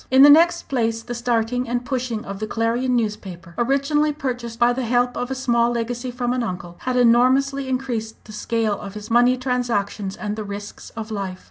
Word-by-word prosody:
In 260 +1 +7
the 290 - +10
next 340 +3 +5
place, 225 -3 -1
the 240 - -5
starting 240 +1 -1
and 245 0 -1
pushing 245 -4 -3
of 195 0 -6
the 215 - -3
Clarion 235 +3 0
newspaper 195 -7 -3
originally 280 - +1
purchased 250 -5 -4
by 240 +1 +4
the 260 - -2
help 245 +1 +1
of 245 - -3
a 265 - -2
small 235 -2 +2
legacy 240 +2 -3
from 245 0 -2
an 250 - -1
uncle 180 -5 -5
had 255 -1 -2
enormously 260 +3 +3
increased 245 -4 -2
the 215 - -11
scale 215 -1 -1
of 200 -1 -8
his 210 +1 -8
money 245 +2 +4
transactions 230 -6 -2
and 210 0 -3
the 215 - -3
risks 205 0 -8
of 220 0 -5
life. 195 -3 -4
240 Hz, 200 wpm, -22 LUFS, 215-255 Hz, -, the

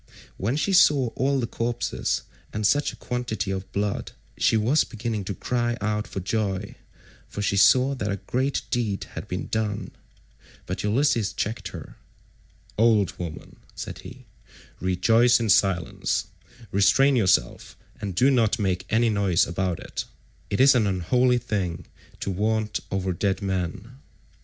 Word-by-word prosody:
When 115 +8 -1
she 195 +6 0
saw 145 -8 +5
all 135 +4 0
the 120 - 0
corpses 115 0 -2 0.3
and 105 0 -2
such 145 +7 +2
a - - -12
quantity 125 -5 -3
of 95 0 -5
blood, 100 0 -2 0.2
she 110 - +3
was 125 +8 +3
beginning 110 -3 -4
to 100 - -4
cry 120 -1 -1
out 105 0 -1
for - - -5
joy, 100 0 -2 0.6
for 105 - -4
she 100 - +1
saw 130 +7 +5
that 125 -6 -3
a - - 0
great 130 +7 -1
deed 110 -5 -1
had - - -7
been - - -4
done; 110 -2 -2 0.7
but - - -4
Ulysses 115 0 +1
checked 105 -2 -3
her, 90 -5 -10 0.8
"Old 110 -4 +3
woman," 85 -3 -7 0.2
said - - -6
he, - - -12 0.5
"rejoice 115 +7 +3
in 115 -2 -1
silence; 95 -2 +1 0.5
restrain 135 +8 +4
yourself, 95 - +1 0.2
and 100 -3 -4
do 130 +8 +4
not 120 -3 +2
make 95 -4 -1
any 115 +1 +3
noise 100 -4 +2
about 90 0 -2
it; - - -5 0.4
it 100 - -1
is 135 +1 +7
an 115 -5 +2
unholy 125 +8 +2
thing 100 -8 -3 0.4
to 100 - -2
vaunt 110 +2 0
over 95 -1 -1
dead 95 +3 -1
men. 95 +5 -3
105 Hz, 150 wpm, -25 LUFS, 95-120 Hz, 0.8 s, is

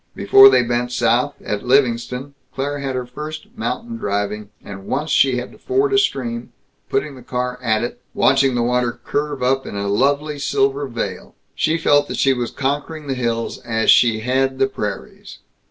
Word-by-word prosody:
Before 400 0 +8
they - - +4
bent 120 +1 -1
south, 125 +3 +1
at 105 -1 -3
Livingston, 125 +1 +1 0.2
Claire 145 +2 -2
had 135 -2 -3
her 125 -1 -3
first 150 +5 -8
mountain 115 0 -4
driving, 105 0 -3
and 95 -1 -10
once 150 +4 -2
she 135 -4 +4
had 125 - -5
to - - -17
ford 400 +1 0
a 400 - +5
stream, 120 - -2 0.4
putting 150 -1 -1
the 130 - -12
car 125 0 -3
at 110 -2 +1
it, 120 0 -5
watching 135 -1 +3
the 120 - +1
water 125 0 0
curve 145 -2 -2
up 135 +1 +1
in - - -7
a 100 0 -2
lovely 145 +7 +1
silver 140 0 0
veil. 120 -2 -5 0.2
She 160 +1 +1
felt 145 -3 +3
that - - -5
she 135 - +3
was 120 -2 -3
conquering 145 +3 -3
the 135 - -2
hills 115 -2 -2
as 110 -2 +2
she 115 -3 +4
had 130 +2 0
the 135 - +3
prairies. 105 -6 -6
125 Hz, 185 wpm, -20 LUFS, 120-140 Hz, 0.4 s, Before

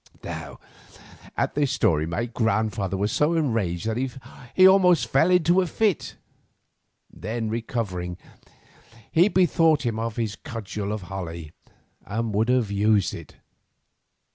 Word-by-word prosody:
Now - - -7 0.8
at - - 0
this 145 -2 +1
story 80 0 +1
my 95 +8 -2
grandfather 110 -4 -1
was 105 +2 0
so 150 +7 +2
enraged 110 - -1
that 125 +4 -2 0.4
he 185 0 +8
almost 180 -9 +5
fell 135 +9 +3
into 180 0 +4
a 180 - -1
fit; 205 0 0 1.0
then 110 0 -4
recovering, 100 -7 -3 0.9
he 170 +4 +5
bethought 165 -7 +3
him 115 -2 -1
of 115 -1 -3
his 110 -3 -2
cudgel 105 -2 -5
of 105 -3 -4
holly, 85 -4 -7 0.5
and 115 +1 -3
would 110 +4 +1
have 125 -5 +2
used 105 0 +2
it. - - -10
115 Hz, 130 wpm, -24 LUFS, 100-150 Hz, 1.0 s, he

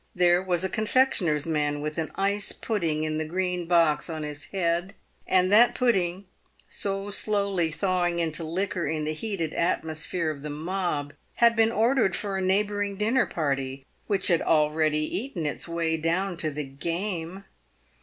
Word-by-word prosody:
There 175 0 +4
was 180 -2 0
a - - +2
confectioner's 205 - +1
man 150 -2 0
with 150 +2 -3
an 160 - -2
ice 200 +1 0
pudding 165 -9 -1
in 155 0 -1
the - - 0
green 180 +1 -2
box 165 -3 +3
on 160 -1 -4
his 145 -2 -7
head, 175 +2 -1 0.3
and 185 0 +3
that 235 +4 +6
pudding, 195 -6 +1 0.4
so 195 0 -3
slowly 200 -5 0
thawing 175 0 0
into 165 -1 -1
liquor 170 +1 -2
in 155 0 -1
the 155 +1 -1
heated 170 -2 -3
atmosphere 160 0 -1
of 145 -2 -8
the 150 - -5
mob, 155 -2 -2 0.2
had 235 -1 +5
been 225 0 +4
ordered 230 -3 +2
for 200 -2 -3
a 190 - -1
neighbouring 200 +1 0
dinner 225 +6 +2
party, 135 -3 -2 0.2
/which 200 -2 +2
had 170 -2 +3
already 155 0 +2
eaten 210 - -3
its 150 - -3
way 165 -1 -1
down 175 +4 0
to 160 -2 0
the 150 0 -4
game. 170 +6 -4
175 Hz, 165 wpm, -26 LUFS, 155-195 Hz, 0.4 s, that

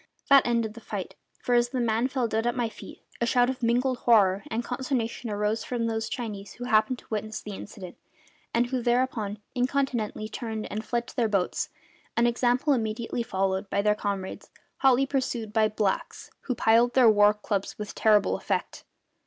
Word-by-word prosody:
That 275 -2 +7
ended 230 -2 0
the 235 - -11
fight; 200 -5 -5 0.3
for 245 - 0
as 240 0 +3
the 255 0 -2
man 230 +1 +1
fell 255 -3 -1
dead 225 +1 -1
at 240 - 0
my 240 -3 0
feet - - -12 0.2
a 235 - +2
shout 245 +1 +3
of 260 - -9
mingled 245 +2 +1
horror 200 -5 +4
and 230 +2 -2
consternation 245 -2 -3
arose 210 +2 -1
from 240 -2 -2
those 225 -1 -2
Chinese 210 -5 -5
who 245 - -8
happened 245 +2 +2
to - - -16
witness 215 0 -3
the 210 - -8
incident, 190 -2 -9 0.5
and 235 +1 +2
who 255 -1 0
thereupon 240 -4 0 0.2
incontinently 250 -5 -1
turned 220 -1 -5
and 215 +1 -3
fled 235 +1 -2
to - - -13
their 230 -3 +1
boats, 195 -3 0 0.5
an 235 - +4
example 245 +4 +2
immediately 230 0 -2
followed 190 -2 -1
by 200 - 0
their 210 0 +4
comrades, 200 -2 -4 0.3
hotly 270 0 +4
pursued 250 -5 -2
by 220 -1 +4
the 215 - -11
blacks, 205 -3 -2
who 250 - -1
plied 235 +2 +3
their 255 -3 +6
war 210 -1 +6
clubs 205 -2 -3
with 210 -1 -6
terrible 210 -2 +3
effect. - - -3
230 Hz, 185 wpm, -27 LUFS, 210-245 Hz, 0.5 s, That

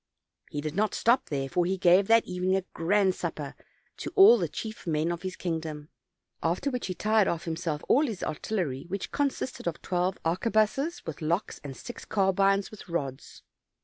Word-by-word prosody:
He 145 - -4
did 155 0 -4
not 210 +4 0
stop 235 +3 +2
there, 135 -2 -1
for 175 +6 +1
he 190 +2 0
gave 185 +2 +5
that 230 0 +5
evening 180 +1 0
a 190 - 0
grand 190 +3 +2
supper 155 -5 -5 0.4
to - - -5
all 420 +4 +8
the - - 0
chief 220 -4 -7
men 160 +1 +1
of 170 - -4
his 185 -1 -4
kingdom; 160 -3 -4 0.5
after 180 +12 0
which 250 -5 -3
he 185 - -3
tired 215 +2 +3
off 170 0 -2
himself 160 -2 -3
all 290 +3 +4
his 215 -6 -5
artillery, 155 -4 -2
which 195 +2 -4
consisted 275 -7 -2
of 170 - -2
twelve 180 +1 0
arquebuses 220 - +1
with 160 -2 -6
locks 170 +6 -1
and 135 -2 -7
six 240 - -8
carbines 195 0 +2
with 210 -3 -12
rods. 140 -6 -4
180 Hz, 180 wpm, -28 LUFS, 165-215 Hz, 0.5 s, all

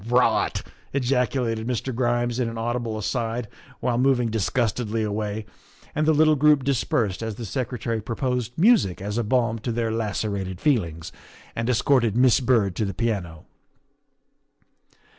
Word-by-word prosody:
" 105 - -12
Rot!" - - +1 0.3
ejaculated 125 -3 0
Mr. 125 +1 -2
Grimes 120 0 0
in 120 -2 0
an 115 - -7
audible 115 -1 -2
aside 115 +1 -2 0.3
while 120 -1 0
moving 125 -3 +2
disgustedly 110 +1 0
away, 105 0 -3 0.5
and 155 +1 0
the - - +6
little 155 0 +4
group 150 -1 +4
dis 135 -2 +1
persed 100 -5 0
as 110 -2 -3
the 115 - -6
Secretary 115 -1 -3
proposed 125 +1 -2
music 190 - +4
as 105 +4 -3
a - - 0
balm 115 0 +1
to 120 +2 -3
their 115 -1 -1
lacerated 100 -4 -2
feelings, 85 - 0 0.4
and 115 +1 -2
escorted 120 -2 +2
Miss 125 -1 +5
Byrd 115 -8 +2
to 110 - +1
the 95 -2 -4
piano. 95 -9 -3
115 Hz, 150 wpm, -24 LUFS, 110-125 Hz, 0.5 s, the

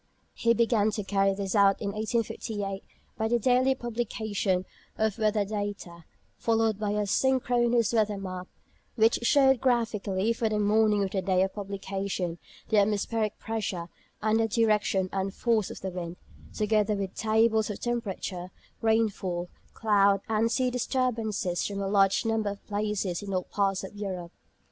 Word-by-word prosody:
He 230 0 +2
began 225 -2 +3
to 210 - -2
carry 195 0 +1
this 195 -1 -3
out 200 -2 +4
in 200 -2 -2
1858 215 -2 -3 0.4
by 220 - +1
the 240 +1 +2
daily 255 +3 +3
publication 220 -6 -2 0.3
of 220 0 0
weather 215 -1 +2
data, 205 -5 -5 0.3
followed 225 -2 +1
by 210 -1 -1
a 210 - 0
synchronous 240 0 +2
weather 215 -2 +2
map, 185 -2 -6 0.5
which 225 -1 +4
showed 265 +1 +4
graphically 225 -4 +1
for 225 -1 -1
the 215 - 0
morning 210 0 +3
of 190 - -2
the 195 - -1
day 185 -1 +2
of 190 - -2
publication 195 -3 -4 0.3
the 215 - +4
atmospheric 215 +1 0
pressure 195 -6 -4 0.3
and 215 +1 +3
the 225 - +2
direction 210 -4 +2
and 195 0 -2
force 225 -4 +1
of - - -9
the 190 - -3
wind, 175 -1 -5 0.4
together 210 0 +1
with 195 -2 -3
tables 220 0 +2
of 210 - -5
temperature, 195 -6 -3 0.3
rainfall, 200 -6 0 0.3
cloud, 200 -3 +3
and 225 +1 +1
sea 250 +1 +1
disturbances 225 -8 -1
from 200 -1 -4
a 195 - -2
large 195 +1 +3
number 225 -2 0
of 200 0 -8
places 205 -4 -2
in 200 -1 -6
all 185 - 0
parts 195 -1 -1
of 190 - -8
Europe. 185 -4 -5
210 Hz, 155 wpm, -28 LUFS, 195-225 Hz, 0.5 s, out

